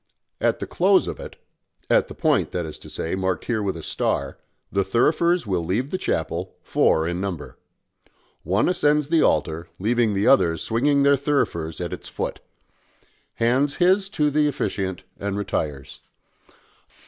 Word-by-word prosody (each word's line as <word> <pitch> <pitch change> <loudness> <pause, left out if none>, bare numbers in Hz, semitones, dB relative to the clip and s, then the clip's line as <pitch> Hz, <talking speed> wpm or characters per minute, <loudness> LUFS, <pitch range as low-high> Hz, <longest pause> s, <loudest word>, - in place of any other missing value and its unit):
At - - +1
the - - -4
close - - +3
of - - -5
it - - -8 0.5
at - - +3
the - - -10
point, - - +2
that 90 -2 -2
is 80 - -8
to - - -12
say, 80 - -4
marked 95 -1 -1
here 115 -3 -1
with 95 -4 -2
a 80 - -8
star, 70 -2 -2 0.3
the 100 0 +1
thurifers 160 - +2
will 95 -4 -1
leave 110 - -1
the 185 - 0
chapel, 85 +3 -2
four 80 +1 +2
in 85 +1 -2
number. 95 -6 -5 0.8
One 95 +6 +1
ascends 150 -4 +2
the 165 -1 +4
altar, 80 +2 +1
leaving 110 +1 +1
the 100 +2 +1
others 85 - +4
swinging 140 +5 +2
their 140 0 +5
thurifers 125 - -1
at 85 -2 -4
its - - -8
foot - - -4 1.0
hands 130 +5 +2
his 190 +2 +3
to 150 -1 +3
the 150 +1 +3
officiant 95 -9 -2 0.2
and 100 0 -3
retires. 75 -9 -3
100 Hz, 160 wpm, -23 LUFS, 85-140 Hz, 1.0 s, their